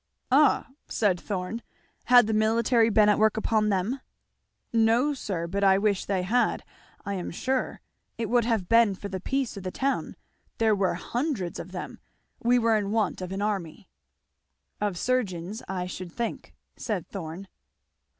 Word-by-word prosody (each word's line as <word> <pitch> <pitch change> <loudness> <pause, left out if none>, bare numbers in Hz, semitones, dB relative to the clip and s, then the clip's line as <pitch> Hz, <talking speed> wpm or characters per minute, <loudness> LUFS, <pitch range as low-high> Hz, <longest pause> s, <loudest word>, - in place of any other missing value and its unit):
"Ah!" 285 +1 +4 0.2
said 195 -5 +1
Thorn, 200 +4 -4 0.4
"had 245 -2 +7
the 220 - -1
military 225 +2 +3
been 215 -1 +5
at 210 - +4
work 220 0 +3
upon 215 -1 +1
them?" 205 +7 0 0.7
"No 230 +6 +3
sir, 190 -10 -3
but 200 +4 -2
I 195 -1 +6
wish 200 -1 +1
they 190 -2 0
had, 235 +7 +1 0.4
I 200 - -2
am 185 -3 -4
sure; 260 +9 -2 0.4
it 230 - -2
would 240 +1 +3
have 225 -6 0
been 230 -2 +4
for 200 +2 -7
the 190 -1 -4
peace 265 +2 -2
of - - -6
the 185 - -4
town. 270 +8 -2 0.4
There 225 -2 +3
were 195 -3 +1
hundreds 235 - -3
of 185 - -8
them. 180 - -7 0.4
We 245 +1 +4
were 230 -2 +3
in 205 -2 -2
want 215 -2 0
of 185 0 -5
an 195 +1 -2
army." 195 -2 -3 0.9
"Of 205 -4 -1
surgeons, 205 -4 -1
I 180 -1 -3
should 180 -1 -7
think," 235 +5 -5 0.2
said 210 -7 -3
Thorn. 180 0 -7
210 Hz, 165 wpm, -27 LUFS, 190-230 Hz, 0.9 s, had